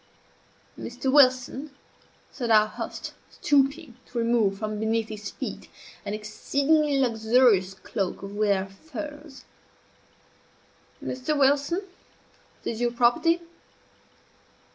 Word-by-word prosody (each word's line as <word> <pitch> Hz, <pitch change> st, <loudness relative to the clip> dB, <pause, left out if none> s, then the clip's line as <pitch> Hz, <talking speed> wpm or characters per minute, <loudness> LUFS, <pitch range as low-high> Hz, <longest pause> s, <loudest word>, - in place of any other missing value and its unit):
"Mr. 255 Hz, +2 st, -3 dB
Wilson," 260 Hz, +1 st, +4 dB, 0.6 s
said 240 Hz, -3 st, -4 dB
our 215 Hz, -1 st, +6 dB
host, 215 Hz, -, -6 dB, 0.2 s
stooping 280 Hz, -2 st, +1 dB
to 245 Hz, -, -8 dB
remove 230 Hz, -4 st, +2 dB
from 215 Hz, 0 st, -3 dB
beneath 220 Hz, 0 st, 0 dB
his 210 Hz, -1 st, -6 dB
feet -, -, -7 dB, 0.4 s
an 205 Hz, +1 st, -2 dB
exceedingly 280 Hz, +7 st, +1 dB
luxurious 220 Hz, -5 st, +3 dB
cloak 195 Hz, 0 st, -4 dB
of 200 Hz, +1 st, -7 dB
rare 200 Hz, -3 st, +2 dB
furs, 290 Hz, +5 st, -9 dB, 1.6 s
"Mr. 260 Hz, +4 st, -2 dB
Wilson, 285 Hz, +7 st, +2 dB, 0.8 s
this 230 Hz, -, -3 dB
is -, -, -6 dB
your 240 Hz, 0 st, +2 dB
property." 245 Hz, +8 st, +3 dB
240 Hz, 100 wpm, -26 LUFS, 215-280 Hz, 1.6 s, our